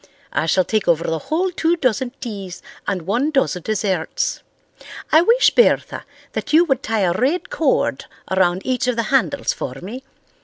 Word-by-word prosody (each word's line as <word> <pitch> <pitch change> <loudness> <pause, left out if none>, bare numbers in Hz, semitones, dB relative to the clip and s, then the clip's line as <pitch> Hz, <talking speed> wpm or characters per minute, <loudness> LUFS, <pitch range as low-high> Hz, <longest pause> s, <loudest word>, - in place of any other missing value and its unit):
I 160 - 0
shall 185 +3 +3
take 215 -1 -1
over 170 -1 +3
the 160 -1 -2
whole 360 +4 +1
two 335 0 +1
dozen 255 -3 0
teas 195 -6 -7 0.2
and 190 -4 -1
one 235 - 0
dozen 270 - 0
desserts. 205 - -1 0.7
I 315 - +7
wish, 465 +8 +4
Bertha, 480 - +2 0.3
that 295 - -4
you 325 +3 +6
would 270 -5 0
tie 225 -6 -1
a 180 -2 +2
red 265 - -1
cord - - 0 0.3
around 185 -1 +2
each 255 -1 0
of 250 - +1
the 230 - 0
handles 270 +1 +1
for 125 - -5
me. 205 - -8
230 Hz, 175 wpm, -20 LUFS, 185-295 Hz, 0.7 s, I